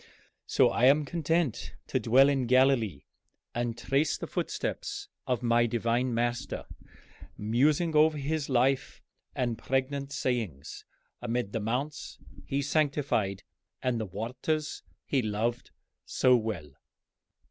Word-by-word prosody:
So - - +4
I 120 - +2
am 145 +3 +5
content 165 -2 -1
to - - -1
dwell 130 +4 +5
in 135 -3 +1
Galilee 125 - +3 0.5
and 120 -1 -2
trace 135 +5 +1
the - - -5
footsteps - - -4 0.2
of 125 -1 0
my 120 0 +3
Divine 120 +2 0
Master, 120 +3 -2 0.7
musing 145 +10 +2
over 155 0 +5
his 145 +1 -2
life 130 +1 +1 0.3
and 120 -3 -1
pregnant 135 +1 -1
sayings 110 - -3 0.4
amid 120 -3 -2
the 115 - -2
mounts 125 +8 -3 0.3
he 140 +1 -1
sanctified 140 -10 0 0.4
and 125 -3 0
the 110 - -3
waters 125 - -3 0.2
he 135 - +1
loved 110 +2 -2 0.4
so 130 -1 +4
well." 110 - -3
125 Hz, 120 wpm, -29 LUFS, 115-140 Hz, 0.7 s, am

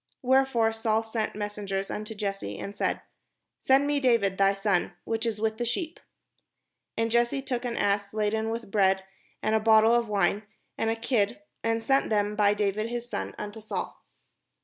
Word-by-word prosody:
Wherefore 255 -3 +3
Saul 225 0 0
sent 225 -2 -3
messengers 205 -2 -3
imto 215 +1 -5
Jesse, 195 - -3
and 200 - -6
said: - - -1 0.6
"Send 270 +2 +4
me 290 0 +1
David 230 -7 +2
thy 195 0 +5
son, 195 -3 0
which 225 +1 -2
is 215 -2 -2
with 220 +1 -1
the - - 0
sheep." 275 +8 -3 1.0
And 225 0 0
Jesse 240 +3 +2
took 250 -2 -3
an 235 -1 -2
ass 200 0 +1
laden 220 +1 0
with 225 -2 -5
bread, 190 -2 +3 0.4
and 215 - +1
a 220 - +4
bottle 220 +1 +5
of 235 -2 +2
wine, 200 0 +2 0.3
and 225 - 0
a 225 - +1
kid, 225 0 0 0.2
and 225 0 0
sent 270 +4 +2
them 210 -1 +1
by 205 -1 +3
David 210 +2 0
his 240 0 -4
son 95 - -4
unto 210 +2 -6
Saul. 215 - -5
220 Hz, 175 wpm, -27 LUFS, 205-235 Hz, 1.0 s, thy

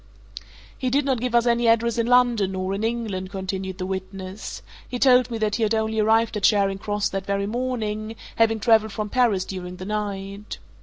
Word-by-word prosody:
"He 255 - -2
did 275 +2 +1
not 265 -3 +1
give 245 0 -1
us 235 0 +4
any 235 0 +2
address 230 +1 +3
in 230 - +1
London, 240 -6 +3
nor 185 0 -2
in 200 +2 -3
England," 220 -5 -2
continued 190 -1 -4
the 185 - -3
witness. 190 +1 -6 0.3
"He 250 - -3
told 250 -1 +5
me 230 - -3
that 215 -1 0
he - - -4
had 220 0 +2
only 220 0 0
arrived 225 +1 +3
at 210 - -2
Charing 195 -1 +3
Cross 205 0 -1
that 195 0 -4
very 200 0 0
morning, 220 -2 -3 0.2
having 225 -1 +3
travelled 220 0 +3
from 215 -1 -3
Paris 215 -6 +2
during 180 -2 -6
the 185 +1 -8
night. 200 -1 -4
215 Hz, 200 wpm, -24 LUFS, 195-230 Hz, 0.3 s, told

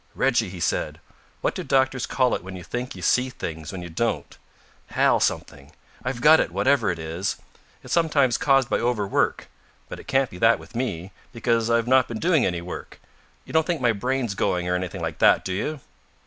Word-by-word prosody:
"Reggie," 120 -6 +1
he 90 -1 -9
said, - - -1 0.4
"what - - 0
do - - -5
doctors 130 -2 +1
call 130 -2 +1
it - - -2
when 95 0 -8
you 90 - -8
think 125 +5 -5
you 90 - -9
see 125 +8 +2
things 80 -10 -6
when 90 -2 -6
you 85 - -7
don't? 115 +8 -2 0.5
Hal - - +3
something. 70 +1 -2 0.3
I've 125 -1 -3
got 155 +3 +7
it, - - +1
whatever 140 -3 +2
it 85 - -1
is. 80 +4 -3 0.5
It's - - -5
sometimes 145 -7 +3
caused 135 -3 +3
by - - 0
overwork. 115 -5 0 0.4
But - - -7
it - - -13
can't 135 -2 +1
be 90 - -10
that 115 - +5
with - - -15
me, 100 -7 -3 0.2
because 115 -1 0
I've 115 -1 +2
not 130 0 +4
been 115 - -5
doing 165 +1 +2
any 90 -2 -2
work. 90 - -8 0.5
You - - -11
don't 160 -1 +3
think 170 -3 0
my 120 -2 +3
brain's 125 +1 -1
going 90 -2 -1
or 90 - 0
anything 90 -2 -3
like - - -4
that, - - +4
do 95 - -2
you?" 145 +9 -3
115 Hz, 205 wpm, -24 LUFS, 90-130 Hz, 0.5 s, got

